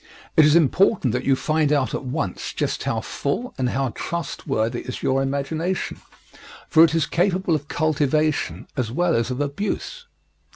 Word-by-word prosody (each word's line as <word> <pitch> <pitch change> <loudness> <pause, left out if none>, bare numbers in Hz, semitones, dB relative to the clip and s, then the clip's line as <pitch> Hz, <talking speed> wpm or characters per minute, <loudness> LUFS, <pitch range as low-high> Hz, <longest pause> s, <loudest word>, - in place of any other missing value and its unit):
It 155 - +7
is 150 +1 +5
important 170 - +3
that 125 - -2
you 135 - +4
find 155 +1 +1
out 140 -3 +1
at - - -3
once 130 - -3
just - - -2
how - - -1
full 230 - -3
and 125 -1 +1
how 135 +1 0
trustworthy 120 -7 -3
is 130 - -7
your 135 +1 +2
imagination, 150 +7 -2 0.7
for 160 -1 +6
it 165 -1 +4
is 160 -2 +2
capable 180 +2 +1
of 150 -1 -1
cultivation 155 0 0
as 120 -5 -2
well 170 +5 +1
as 115 +1 0
of 125 +1 -3
abuse. 205 - -3
150 Hz, 165 wpm, -23 LUFS, 130-165 Hz, 0.7 s, It